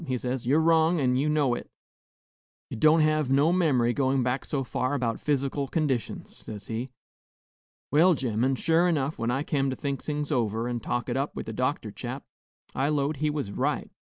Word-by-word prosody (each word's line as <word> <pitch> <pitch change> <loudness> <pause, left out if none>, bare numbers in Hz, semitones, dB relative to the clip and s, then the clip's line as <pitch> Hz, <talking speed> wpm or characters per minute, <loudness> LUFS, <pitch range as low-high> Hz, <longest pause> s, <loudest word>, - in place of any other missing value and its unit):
he 130 -1 0
says, 125 0 -3
'you 140 +4 +4
're - - +4
wrong, 165 +1 +3
an' 125 -3 +2
ye 140 +4 +1
know 145 -5 +2
it; - - -5 1.0
ye - - -4
don't 155 +7 +5
hev 155 -2 +2
no 145 +5 +4
mem'ry 135 -10 +2
goin' 135 0 +1
back 125 +2 -1
so 140 -2 -2
far 130 +2 -1
about 120 -4 -1
phys'cal 140 -1 -1
conditions,' 140 -7 -2
says 105 -2 -9
he. 120 +3 -4 1.0
Well, 165 +5 +5
gemmen, 125 0 0
sure 165 +6 +2
'nough, 145 -1 -1
when 115 - -1
I 135 +4 0
kem 140 -3 0
to 130 - -2
think 140 -2 -3
things 150 0 -3
over, 115 -3 0
and 120 -1 -3
talk 120 +2 -2
it 120 0 -1
up 140 +2 -2
with - - -5
the - - -5
doctor - - -1
chap, - - -6 0.5
I 135 +2 0
'lowed 145 0 0
he 150 +2 0
was 145 -9 -3
right. - - -2
135 Hz, 200 wpm, -27 LUFS, 125-150 Hz, 1.0 s, don't